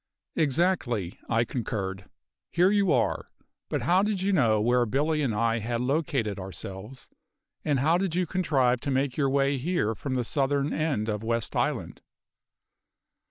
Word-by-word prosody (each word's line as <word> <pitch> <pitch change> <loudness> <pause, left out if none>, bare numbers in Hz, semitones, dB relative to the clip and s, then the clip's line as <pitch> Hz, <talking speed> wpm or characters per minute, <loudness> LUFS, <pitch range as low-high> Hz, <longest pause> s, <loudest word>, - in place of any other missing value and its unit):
"Exactly," 140 - 0
I 115 0 +3
concurred. 100 -6 -4 0.4
"Here 180 +3 +3
you 200 -4 +3
are. - - +1 0.4
But - - -1
how 180 +2 +4
did 210 -1 0
you 195 +2 +1
know 115 - +3
where 120 +2 +2
Billy 150 +6 +1
and 125 -7 0
I 115 +2 +1
had 115 +2 -2
located 130 - -1
ourselves? 95 +6 -7 0.6
and 145 -4 +1
how 165 +5 +3
did 185 -3 -1
you 180 0 +1
contrive 135 -9 +1
to - - -3
make 135 -1 0
your 140 -3 +1
way 140 0 +1
here 140 -7 0
from 130 +5 -4
the 125 -2 0
southern 140 +2 0
end 150 -9 -1
of 105 -2 -2
West 115 0 -2
Island?" - - -1
135 Hz, 160 wpm, -27 LUFS, 115-160 Hz, 0.6 s, how